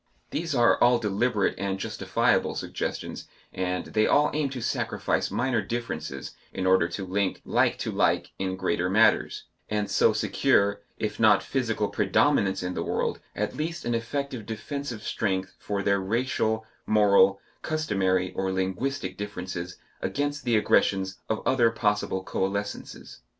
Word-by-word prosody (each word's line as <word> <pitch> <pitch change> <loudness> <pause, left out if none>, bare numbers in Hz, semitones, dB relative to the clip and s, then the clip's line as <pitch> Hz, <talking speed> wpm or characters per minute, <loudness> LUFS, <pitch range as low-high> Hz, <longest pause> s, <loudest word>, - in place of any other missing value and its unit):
These 165 -3 -2
are 120 -1 +4
all 120 0 +6
deliberate 105 0 +1
and 100 -1 -1
justifiable - - +1
suggestions, - - -4 0.3
and 90 0 -2
they 110 0 +1
all 150 +1 +4
aim 150 -2 0
to 130 -1 -5
sacrifice 115 - -1
minor 125 -3 0
differences 80 - -5 0.2
in 95 - -3
order 95 -2 +4
to 95 +2 -5
link 95 +1 -1
like - - +2
to - - -3
like - - +1
in 95 -1 -1
greater 90 -1 0
matters, 110 +4 +3 0.3
and 105 -1 -1
so - - +4
secure, 100 0 +2 0.2
if 105 - -3
not 110 -2 +5
physical 115 -5 -1
predominance 100 -11 +2
in 90 0 -2
the - - -3
world, - - -1 0.2
at - - -2
least 165 +2 -3
an 120 - 0
effective 120 0 -3
defensive 120 0 -5
strength 95 -3 -1
for 100 -1 -3
their 100 0 +2
racial, 110 +1 0 0.2
moral, 100 -2 +5 0.2
customary, 95 - 0
or 95 0 -1
linguistic 95 +2 -2
differences 90 -3 -5 0.2
against 145 0 -2
the 120 -2 +3
aggressions 95 -2 +2
of 110 - -2
other 120 -3 +4
possible 105 -4 0
coalescences. 100 -4 -4
105 Hz, 145 wpm, -27 LUFS, 95-120 Hz, 0.3 s, all